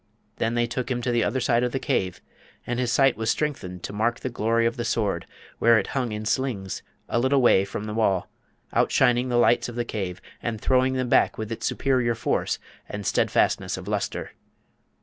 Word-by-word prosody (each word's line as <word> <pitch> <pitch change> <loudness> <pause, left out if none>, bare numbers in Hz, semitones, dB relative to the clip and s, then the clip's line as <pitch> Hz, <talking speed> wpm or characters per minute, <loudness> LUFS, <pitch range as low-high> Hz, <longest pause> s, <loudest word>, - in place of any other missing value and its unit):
Then 115 +1 0
they 120 0 +2
took 120 +2 -3
him 125 -2 0
to 125 - 0
the 120 -1 +2
other 125 +6 0
side 120 -1 +2
of 125 0 0
the - - +1
cave, 110 - -1 0.4
and 120 0 -2
his 125 -2 0
sight 135 +1 +4
was 110 0 -2
strengthened 95 - -2
to - - -5
mark 115 +3 0
the 130 - -4
glory 115 0 +1
of 115 +1 +1
the 120 - -3
Sword, 105 -6 -1 0.3
where 115 0 +6
it 105 - +1
hung 125 -4 -1
in 105 0 -4
slings, 110 -6 -1 0.3
a 120 - 0
little 130 +3 +3
way 120 -6 +5
from 100 - -5
the 105 0 -4
wall, 100 -5 +1 0.5
outshining 125 -1 +3
the 120 - +1
lights 120 0 +3
of 120 - -8
the 120 0 -1
cave, 95 -6 -4 0.2
and 115 -2 -3
throwing 130 +3 +2
them 130 -1 -1
back - - +3
with 110 0 -5
its 115 - -2
superior 125 -4 +1
force 115 - 0 0.3
and 100 0 -5
stedfastness - - +1
of - - -9
lustre. - - -2
120 Hz, 210 wpm, -25 LUFS, 110-125 Hz, 0.5 s, where